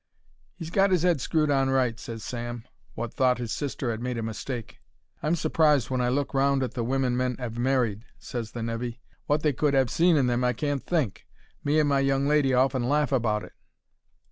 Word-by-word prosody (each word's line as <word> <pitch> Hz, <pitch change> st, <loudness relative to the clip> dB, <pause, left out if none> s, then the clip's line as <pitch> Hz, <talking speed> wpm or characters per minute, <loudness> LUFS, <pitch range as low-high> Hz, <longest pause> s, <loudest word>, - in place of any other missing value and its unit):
"He's 165 Hz, 0 st, -7 dB
got 195 Hz, +2 st, +3 dB
his 180 Hz, -2 st, +2 dB
'ead 170 Hz, -7 st, +2 dB
screwed 155 Hz, 0 st, +1 dB
on 135 Hz, -1 st, +2 dB
right," 125 Hz, -3 st, +1 dB
ses 115 Hz, -2 st, -7 dB
Sam, 120 Hz, -1 st, -5 dB, 0.3 s
wot 120 Hz, 0 st, -4 dB
thought 130 Hz, -1 st, +2 dB
his 120 Hz, -2 st, -4 dB
sister 135 Hz, -3 st, -3 dB
'ad 110 Hz, 0 st, -5 dB
made 125 Hz, -1 st, -3 dB
a 115 Hz, -, -2 dB
mistake. 115 Hz, +2 st, -5 dB, 0.4 s
"I'm 155 Hz, +3 st, +1 dB
surprised 150 Hz, -6 st, +2 dB
when 130 Hz, -1 st, 0 dB
I 125 Hz, -, +1 dB
look 140 Hz, +2 st, -1 dB
round 135 Hz, 0 st, +2 dB
at 130 Hz, -, -3 dB
the 120 Hz, -, -2 dB
wimmen 130 Hz, 0 st, 0 dB
men 125 Hz, 0 st, 0 dB
'ave 120 Hz, -2 st, -5 dB
married," 120 Hz, -4 st, 0 dB
ses 115 Hz, -3 st, -6 dB
the 120 Hz, -, -4 dB
nevy; 115 Hz, +1 st, -4 dB, 0.3 s
"wot 150 Hz, +1 st, +1 dB
they 150 Hz, -2 st, +2 dB
could 140 Hz, +1 st, +1 dB
'ave 130 Hz, -3 st, +2 dB
seen 170 Hz, 0 st, +4 dB
in 135 Hz, -, +3 dB
them 125 Hz, 0 st, +1 dB
I 125 Hz, 0 st, +2 dB
can't 145 Hz, -1 st, -2 dB
think. 155 Hz, -, -2 dB, 0.4 s
Me 150 Hz, +2 st, +2 dB
and 150 Hz, -, +3 dB
my 140 Hz, -1 st, +2 dB
young 135 Hz, 0 st, +1 dB
lady 145 Hz, -2 st, +3 dB
often 130 Hz, -1 st, +2 dB
laugh 150 Hz, 0 st, +2 dB
about 110 Hz, -5 st, +1 dB
it." -, -, -12 dB
130 Hz, 215 wpm, -26 LUFS, 120-145 Hz, 0.4 s, seen